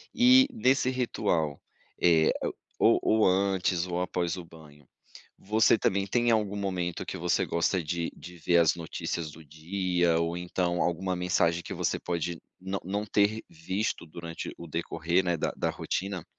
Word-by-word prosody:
E, 255 +2 +7
nesse 135 - +2
ritual, 100 - -1 0.4
eh, 80 -2 +5 0.5
ou 110 0 +4
antes 95 -2 +2
ou 90 0 -2
após 90 -1 -1
o 90 - -7
banho, 75 -4 -16 0.5
você 110 +3 +3
também 100 -2 0
tem 120 +4 +1
algum 105 -3 +1
momento 90 -4 -2
que - - -5
você 90 +1 +1
gosta 85 +2 0
de 85 +1 -2
de 90 +1 -11
ver 85 +1 +3
as 85 -1 +4
notícias 85 -1 -4
do 80 +2 -13
dia, 85 +2 0
ou 85 +1 -1
então 90 0 -1
alguma 90 +2 -1
mensagem 85 -1 +1
que - - -6
você - - -1
pode 85 -1 -3 0.2
não 95 +1 -3
não 100 +3 -2
ter 105 +2 +2
visto 95 +4 -3
durante 85 +1 -7
o 85 - -9
decorrer, 85 +3 0
né, 90 -1 +1
da - - -2
da - - 0
rotina? 95 -2 -3
90 Hz, 155 wpm, -28 LUFS, 85-100 Hz, 0.5 s, E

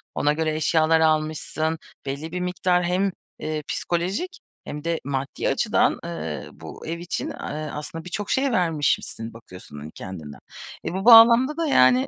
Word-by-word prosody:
ona 150 +1 +2
göre 155 0 -1
eşyalar 160 +1 +3
almışsın. 155 0 0 0.3
Belli 140 +4 -4
bir 180 - -3
miktar 180 0 +1
hem, 185 +3 +1 0.3
eee, 155 -1 -3
psikolojik 195 - -2 0.3
hem 150 0 -6
de 165 -1 -1
maddi 135 0 -2
açıdan, - - +2
eee, 80 -3 -5
bu - - -10
ev 170 +1 -3
için, 175 0 -3
eee, - - -6 0.4
aslında 160 +3 -6
birçok 195 +3 -4
şey 270 0 +2
vermişmişsin 150 - 0
bakıyorsun, 90 -9 -12
hani, 75 +2 -9
kendinden. 80 -7 -9 0.5
E, - - -2
bu 195 +3 -3
bağlamda 235 +5 +8
da 330 -2 0
yani, 130 - +5
160 Hz, 155 wpm, -24 LUFS, 140-180 Hz, 0.5 s, bağlamda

